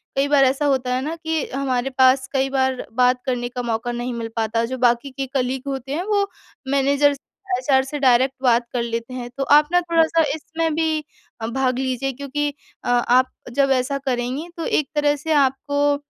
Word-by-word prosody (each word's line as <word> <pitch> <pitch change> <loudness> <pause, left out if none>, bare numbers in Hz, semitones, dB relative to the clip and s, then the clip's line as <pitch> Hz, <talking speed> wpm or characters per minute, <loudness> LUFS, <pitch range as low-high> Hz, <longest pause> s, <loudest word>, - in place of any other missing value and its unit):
कई 275 +1 +2
बार 285 -1 +4
ऐसा 270 +3 +1
होता 260 -3 +1
है 255 - 0
ना 310 +4 -3
कि 320 -2 -2
हमारे 265 -2 -1
पास 260 0 +5
कई 270 0 +1
बार 265 -1 0
बात 250 +1 +3
करने 245 -2 -2
का 250 0 -4
मौका 230 0 -2
नहीं 240 +1 -3
मिल 230 -1 -4
पाता 225 0 0
जो 260 +2 -4
बाकी 240 +2 +2
के 270 +1 -4
कलीग 260 -1 -1
होते 270 0 -4
हैं 335 +4 -1
वो 405 -1 +2 0.4
मैनेजर 280 +1 +3 0.4
एचआर 265 +1 +2
से 285 +2 -5
डायरेक्ट 260 0 +3
बात 240 -1 +3
कर 245 - 0
लेते 230 +1 -4
हैं। 245 -1 -5
तो 275 - 0
आप 300 0 +2
ना 355 0 +4
थोड़ा-सा 330 -1 +2
इसमें 320 0 -2
भी 315 -1 0 0.4
अ, 225 - -2
भाग 255 +1 0
लीजिए 265 0 -1
क्योंकि 280 +2 -2 0.3
अ, - - -3
आप 245 +1 +3 0.2
जब 275 +2 +2
ऐसा 275 +2 -3
करेंगी 255 +6 -2
तो 330 - -3
एक 285 -3 0
तरह 295 0 +2
से 300 +3 -5
आपको 285 +1 +2
265 Hz, 200 wpm, -21 LUFS, 250-290 Hz, 0.4 s, पास